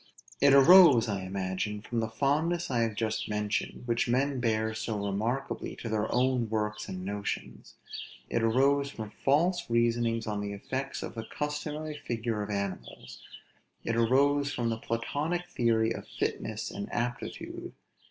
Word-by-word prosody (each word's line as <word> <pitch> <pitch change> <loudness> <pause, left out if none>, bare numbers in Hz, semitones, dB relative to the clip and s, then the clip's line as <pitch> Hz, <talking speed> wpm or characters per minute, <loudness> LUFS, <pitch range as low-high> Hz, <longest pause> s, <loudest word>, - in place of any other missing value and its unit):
It 140 0 +7
arose, 140 -5 +8
I 100 -3 -2
imagine, 95 +2 -2
from 115 +3 -3
the 110 - 0
fondness 150 +8 0
I 120 - +1
have 115 -2 0
just 110 0 -2
mentioned, 105 +2 -2
which 115 0 +1
men 135 +2 +1
bear 110 -2 +1
so 110 0 -3
remarkably 115 +7 -2
to 115 - -6
their 110 0 -1
own 125 -2 +2
works 105 -1 -2
and 95 0 -5
notions; 100 +1 -5 0.5
it 115 - 0
arose 135 +5 +3
from 110 -6 -7
false 170 +8 +1
reasonings 115 -1 +1
on 105 -2 -2
the 100 0 -4
effects 130 +7 -4
of - - -6
the 115 -1 -6
customary 150 +2 -4
figure 115 -2 -2
of 105 - -4
animals; 100 -2 -5 0.6
it 115 - -1
arose 140 +5 +3
from 120 -1 -1
the 115 - -1
Platonic 145 +11 -2
theory 115 -1 +2
of - - -8
fitness - - -3
and 100 - -6
aptitude. 120 +1 -4
115 Hz, 150 wpm, -29 LUFS, 110-140 Hz, 0.6 s, arose